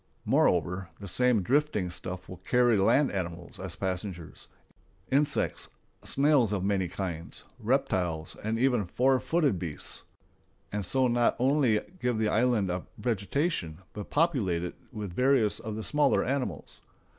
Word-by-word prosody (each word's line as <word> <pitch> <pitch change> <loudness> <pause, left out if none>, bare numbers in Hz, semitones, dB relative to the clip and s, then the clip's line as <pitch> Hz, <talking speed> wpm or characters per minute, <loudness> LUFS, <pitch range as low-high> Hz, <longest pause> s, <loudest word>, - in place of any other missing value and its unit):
Moreover, 90 +1 +2
the 100 - -7
same 120 +2 +2
drifting 130 -7 +1
stuff 90 +1 -5
will 90 - -8
carry 120 +2 +3
land 130 +8 +3
animals 85 -3 -5
as 95 -2 -5
passengers,—insects, 95 - -3 0.3
snails 140 -6 +3
of 100 -3 -1
many 95 -2 +1
kinds, 85 -2 -5 0.2
reptiles, 95 - 0
and 110 +2 -1
even 120 -5 +2
four 130 +7 +2
footed 135 - +1
beasts,—and 90 +4 -5
so 130 +3 +2
not 120 0 +2
only 130 -4 +3 0.2
give 125 -5 0
the 110 -1 +1
island 110 -5 +2
a 90 0 -4
vegetation, 115 - -1 0.2
but 105 -1 -7
populate 125 - +1
it 90 - -4 0.2
with 105 -5 -6
various 125 -1 +2
of 110 -2 -5
the 110 - -4
smaller 150 +4 +2
animals. 125 - -3
105 Hz, 135 wpm, -29 LUFS, 90-130 Hz, 0.3 s, carry